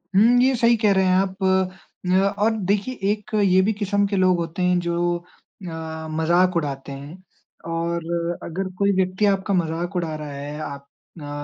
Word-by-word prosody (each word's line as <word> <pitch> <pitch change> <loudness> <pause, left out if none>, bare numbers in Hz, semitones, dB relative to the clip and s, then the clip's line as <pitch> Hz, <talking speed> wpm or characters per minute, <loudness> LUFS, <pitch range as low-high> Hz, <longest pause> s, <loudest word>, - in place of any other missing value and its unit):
हुँ, 235 +5 +6
ये 260 0 +3
सही 235 0 +4
कह 215 -2 +3
रहे 190 0 +3
हैं 185 - +3
आप 190 0 0 0.7
न 185 +1 +3 0.2
और 215 +2 +3 0.2
देखिए 205 +5 0 0.2
एक 210 -1 -5
ये 190 -1 +5
भी 215 +3 +1
किसम 205 -1 0
के 200 - -2
लोग 185 -1 +3
होते 170 +1 -4
हैं 180 0 +3
जो 175 0 0
अ, 175 - -26 0.8
मज़ाक 175 +3 +2
उड़ाते 140 -3 -3
हैं 140 +4 -8 0.6
और 170 0 -2 0.4
अगर 185 +3 -4
कोई 200 0 +3
व्यक्ति 185 +2 +1
आपका 195 0 +1
मज़ाक 170 +1 -1
उड़ा 170 -3 -1
रहा 150 -1 -6
है, 145 +2 -6
आप 140 -2 -7 0.3
ना 145 -2 -8
180 Hz, 180 wpm, -23 LUFS, 165-200 Hz, 0.8 s, हुँ